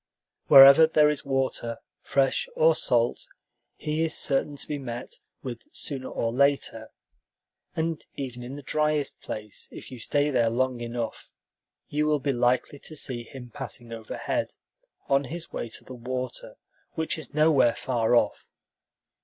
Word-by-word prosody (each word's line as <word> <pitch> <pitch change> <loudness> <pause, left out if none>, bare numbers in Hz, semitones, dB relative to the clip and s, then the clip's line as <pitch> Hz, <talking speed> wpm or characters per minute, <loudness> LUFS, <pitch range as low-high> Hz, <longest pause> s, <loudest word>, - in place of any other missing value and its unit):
Wherever 140 +3 +10
there 150 -1 +4
is 150 - -4
water, 130 -4 -1 0.2
fresh 135 - +1
or - - +5
salt, - - 0 0.5
he 155 +1 -1
is 165 - +1
certain 145 +1 +1
to - - -3
be 150 -1 -3
met 120 -2 -7 0.2
with 120 -3 -6
sooner 135 -3 -4
or 115 0 -2
later; 140 +2 +1 0.9
and 160 0 -2
even 125 -3 -5
in 125 +3 -7
the 145 - -9
driest 150 +1 0
place, 105 -1 -7
if - - -10
you 125 - -8
stay 145 +5 +1
there 120 -4 +3
long 125 +1 0
enough, 120 -1 -5 0.6
you 150 +1 0
will 150 -1 +3
be 140 0 -1
likely 125 +3 +1
to 155 - -8
see 125 -5 -3
him 125 -1 -11
passing 115 +1 -6
overhead, 115 - -3 0.5
on 140 0 +2
his 165 +5 -6
way 120 - -4
to - - -7
the - - -10
water, 125 +1 -5 0.4
which 160 0 -1
is 150 - -10
nowhere 150 -6 +4
far 120 -2 +1
off. 105 -3 +1
135 Hz, 155 wpm, -26 LUFS, 120-150 Hz, 0.9 s, Wherever